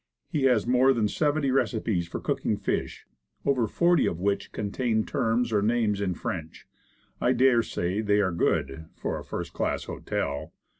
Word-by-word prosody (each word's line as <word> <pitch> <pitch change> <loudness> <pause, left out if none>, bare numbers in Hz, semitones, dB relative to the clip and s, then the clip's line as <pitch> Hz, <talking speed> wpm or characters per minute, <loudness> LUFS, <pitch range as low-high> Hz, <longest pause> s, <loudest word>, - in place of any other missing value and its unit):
He 145 -3 0
has 125 -6 +3
more 130 +2 +4
than 115 -4 +1
seventy 145 +2 +1
receipts 110 -9 0
for - - -5
cooking - - -1
fish, - - -3 0.4
over 130 -5 +2
forty 175 +8 +3
of 85 - -2
which 100 +2 -1
contain 110 +2 -1
terms 115 +1 0
or 105 - +3
names 105 -2 +1
in 95 -3 -1
French. 80 -1 -6 0.5
I 125 - +3
dare 125 -1 +4
say 95 -2 -2
they 105 -1 +2
are 95 -3 +2
good 80 -2 -1
for - - -3
a - - -9
first - - -5
class - - -1
hotel. 70 +1 -4
110 Hz, 165 wpm, -27 LUFS, 100-125 Hz, 0.5 s, more